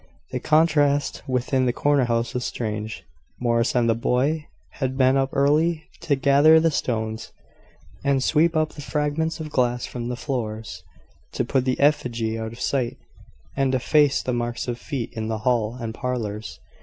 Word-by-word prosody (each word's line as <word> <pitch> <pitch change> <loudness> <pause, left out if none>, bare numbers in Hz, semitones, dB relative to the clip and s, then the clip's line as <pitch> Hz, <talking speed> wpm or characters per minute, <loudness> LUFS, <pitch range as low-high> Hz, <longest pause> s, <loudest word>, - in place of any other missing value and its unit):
The - - -2
contrast 150 -2 +2
within 130 0 +1
the - - +3
corner 145 -1 +2
house 115 0 -1
was 125 - -2
strange. 110 -2 -4 0.4
Morris 115 0 +1
and 120 -1 +3
the 115 - +4
boy 135 +7 0 0.3
had 130 -2 -1
been 130 0 +4
up 135 0 +1
early 155 +4 +2 0.2
to 145 - +1
gather 140 +4 +5
the 165 0 +2
stones, 110 -5 -2 0.7
and 140 -2 +2
sweep 160 +3 +3
up 155 0 0
the 150 - -9
fragments 150 +3 -1
of 155 -1 -6
glass 125 -2 +1
from 120 -1 -5
the 125 - -2
floors, 110 -6 -4 0.5
to - - -1
put 130 -2 0
the 130 -1 0
effigy 120 -6 +1
out 110 0 -4
of 115 - -12
sight, 130 -4 -1 0.6
and 135 -1 +1
efface 145 +2 +3
the 125 - -1
marks 120 0 -2
of 120 -1 -3
feet 135 -6 -4
in 110 -2 -4
the 110 0 -2
hall 120 -2 +1
and 115 -2 -4
parlours. 110 -4 -4
130 Hz, 170 wpm, -23 LUFS, 115-145 Hz, 0.7 s, gather